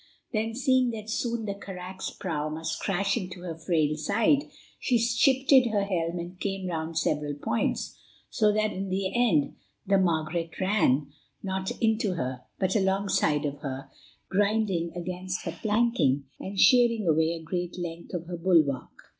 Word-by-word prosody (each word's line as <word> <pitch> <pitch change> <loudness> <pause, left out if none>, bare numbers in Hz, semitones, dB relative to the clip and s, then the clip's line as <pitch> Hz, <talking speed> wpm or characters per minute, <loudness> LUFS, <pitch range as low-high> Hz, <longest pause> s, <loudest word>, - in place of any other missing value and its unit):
Then, 225 +1 -1
seeing 260 -1 +3
that 220 -2 -5
soon 235 -1 -1
the 200 - -2
carack's 190 -1 -7
prow 155 -5 -3
must 160 +1 -4
crash 200 +1 +1
into 185 -4 -6
her 175 -2 -4
frail 160 -2 +1
side, 220 - +2 0.3
she 250 - +2
shifted 255 +3 +4
her 210 -3 +1
helm 175 -3 -1
and 175 +2 -7
came 195 -1 -3
round 165 -2 -3
several 150 -2 0
points, 145 - -2 0.3
so 215 -2 +2
that 215 0 +1
in 195 +1 -4
the 190 0 -1
end 220 -13 +2 0.3
the 195 0 +3
Margaret 165 -1 -1
ran, 150 -8 +2 0.3
not 190 -1 -2
into 220 -4 +1
her, 130 -6 -3 0.2
but 190 +1 0
alongside 190 -7 +2
of 145 0 -3
her, 135 -2 -6 0.4
grinding 200 -4 +1
against 180 +1 -4
her - - -3
planking, 215 - +2 0.2
and 195 +1 -5
shearing 235 -5 +5
away 160 +1 +3
a 165 -1 -7
great 175 +2 -3
length 170 0 -6
of 170 -1 -4
her 175 0 -5
bulwark. 165 -7 +2
185 Hz, 155 wpm, -27 LUFS, 165-215 Hz, 0.4 s, shearing